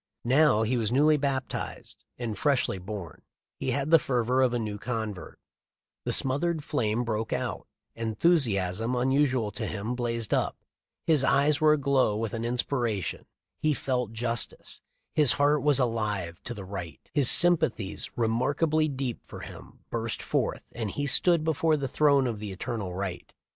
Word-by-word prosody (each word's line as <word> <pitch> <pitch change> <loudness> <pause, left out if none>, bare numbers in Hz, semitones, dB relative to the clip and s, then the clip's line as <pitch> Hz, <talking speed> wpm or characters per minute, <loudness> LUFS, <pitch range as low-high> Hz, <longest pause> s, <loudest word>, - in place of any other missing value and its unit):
Now 130 -3 +4
he 120 +3 0
was 110 -2 0
newly 150 +4 +4
baptized 135 -2 -4
and 115 -3 -4
freshly 135 -9 +1
born; 95 -1 -7 0.4
he - - -2
had 140 +4 -1
the 165 - +8
fervor 125 -1 +1
of 130 -2 +3
a 120 - 0
new 105 -3 -4
convert; 110 -4 -5 0.7
the - - 0
smothered 150 +4 +1
flame 120 -5 0
broke 110 -1 -2
out; - - -3 0.3
enthusiasm 115 - +1
unusual 130 -3 +1
to - - -4
him 110 +3 -3
blazed 115 -3 -2
up; - - 0 0.5
his 155 -4 +3
eyes 140 +1 +3
were 155 -1 +6
aglow 135 -7 +2
with 110 -1 -3
an 115 - -3
inspir 120 +1 0
ation: 100 -3 -4 0.3
he 155 -1 +1
felt 125 -5 -2
justice; 115 +1 -3 0.3
his 150 -3 +5
heart 145 +1 +2
was 145 -2 +3
alive 105 -8 -1
to 120 - -3
the 100 -3 -8
right; 90 -4 -7
his 140 -5 +4
sympathies, 150 - +3
remarkably 145 +7 +1
deep 135 -4 -4
for - - -9
him, - - -11
burst 115 -1 -3
forth, - - -2
and 115 -3 -3
he 145 +7 -3
stood 170 +3 +2
before 160 0 +2
the 140 -2 -2
throne 140 0 +3
of 115 -4 -2
the 105 -1 -5
eternal 100 -1 -4
Right. 90 -1 -5
125 Hz, 160 wpm, -27 LUFS, 110-145 Hz, 0.7 s, the